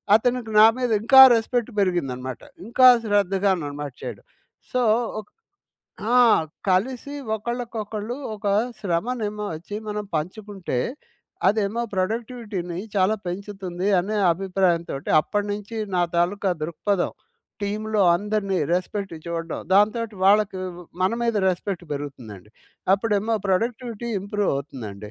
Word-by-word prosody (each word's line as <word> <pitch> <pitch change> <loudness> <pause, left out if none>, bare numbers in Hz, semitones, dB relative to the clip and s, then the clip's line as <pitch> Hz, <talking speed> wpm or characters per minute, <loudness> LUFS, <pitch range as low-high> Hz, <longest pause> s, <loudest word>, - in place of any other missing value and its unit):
అతనికి 240 0 0
నా 215 - +10
మీద 250 -2 -1
ఇంకా 265 +4 +8
రెస్పెక్ట్ 235 +1 0
పెరిగిందనమాట. 135 - -1 0.2
ఇంకా 255 +3 +5 0.2
శ్రద్ధగా 200 -2 +2
నన్ను 145 -1 -5
మార్చాడు. 140 -4 -7 0.5
సో 255 - +1 0.4
ఒక్ 210 - -11 0.9
ఆ! - - +6 0.5
కలిసి 250 +9 0 0.2
ఒకళ్ళకొకళ్ళు 225 -1 -4 0.2
ఒక 210 0 -7 0.3
శ్రమనేమో 210 +3 -2
ఒచ్చి 180 +6 -7
మనం 210 0 -3
పంచుకుంటే 190 - -4 0.7
అదేమో 215 +2 0
ప్రొడక్టివిటీ‌ని 205 -3 -3 0.2
చాలా 195 +2 +3
పెంచుతుంది 190 0 -4
అనే 210 +4 -3 0.2
అభిప్రాయంతోటి 175 -5 -1
అప్పటి 205 +5 -2
నుంచి 210 +2 -6 0.2
నా 175 - +3
తాలూకా 185 +3 +1
దృక్పథం. 175 +4 -1 0.5
టీమ్‌లో 215 +1 0
అందరిని 200 -1 -1 0.2
రెస్పెక్ట్ 195 +1 -3
చూడడం 165 -1 -4
దాంతోటి 215 +1 +2
వాళ్ళకి 200 -1 +4 0.4
మన 185 - +3
మీద 230 - +1
రెస్పెక్ట్ 180 0 -3
పెరుగుతుందండి. 120 -9 -7 0.4
అప్పుడేమో 215 +1 0
ప్రొడక్టివిటీ 230 +3 -1
ఇంప్రూవవుతుందండి. 135 - -3
200 Hz, 105 wpm, -24 LUFS, 175-220 Hz, 0.9 s, నా